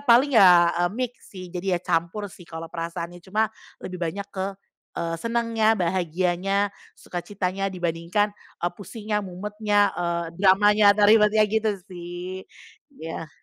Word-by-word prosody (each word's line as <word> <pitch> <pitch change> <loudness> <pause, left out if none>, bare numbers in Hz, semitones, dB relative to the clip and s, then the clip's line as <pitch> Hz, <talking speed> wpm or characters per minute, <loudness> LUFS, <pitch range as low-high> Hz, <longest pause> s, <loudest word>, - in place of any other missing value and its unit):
paling 270 +1 +4
ya 180 -6 +7
e - - +3
mix 250 -1 -4
sih, 185 -3 -10
jadi 180 0 -1
ya - - -2
campur 170 +4 -1
sih 175 -2 -15
kalau 165 0 -8
perasaannya, 170 +1 -5
cuma 215 +4 -1 0.3
lebih 180 -1 -6
banyak 185 +4 -3
ke, 190 0 -2 0.5
eee, 165 0 -2
senengnya, 230 -1 +1
bahagianya, 185 +2 0 0.2
suka 175 - -6
citanya, 195 0 -2
dibandingkan 180 +3 -1 0.3
e - - +3
pusingnya, 210 +2 -4
mumetnya, 205 +2 0
eee, 170 -1 -2
dramanya, 205 +1 +5
atau 210 - +4
ribetnya 215 0 +5
gitu 220 +1 +1
sih, 180 0 -8 0.5
iya. 160 0 -6
190 Hz, 140 wpm, -24 LUFS, 175-210 Hz, 0.5 s, ya